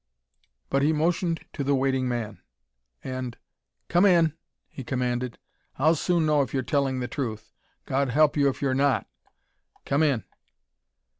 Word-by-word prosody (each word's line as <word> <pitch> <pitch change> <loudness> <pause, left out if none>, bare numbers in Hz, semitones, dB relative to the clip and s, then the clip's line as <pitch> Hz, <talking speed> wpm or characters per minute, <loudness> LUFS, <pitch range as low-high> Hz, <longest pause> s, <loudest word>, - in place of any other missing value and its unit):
But 135 - +2
he 150 +3 +3
motioned 165 +1 0
to 140 - -3
the 140 +1 +2
waiting 130 -1 +1
man, 110 -6 -4 0.6
and 130 -2 -5 0.5
"Come 175 +2 +3
in!" 170 -6 +5 0.3
he 135 - -9
commanded. 125 -1 -2 0.4
"I'll 155 +5 +4
soon 170 +1 +1
know 150 -1 +3
if 135 0 -3
you're 130 - 0
telling 135 -2 0
the 125 - -2
truth. 110 -6 -5 0.3
God 135 0 0
help 150 +4 +3
you 140 -2 +3
if 135 - -5
you're 135 -2 +1
not.... 140 0 +2 0.8
Come 140 +2 +1
in." 140 - +2
140 Hz, 150 wpm, -26 LUFS, 125-155 Hz, 0.8 s, in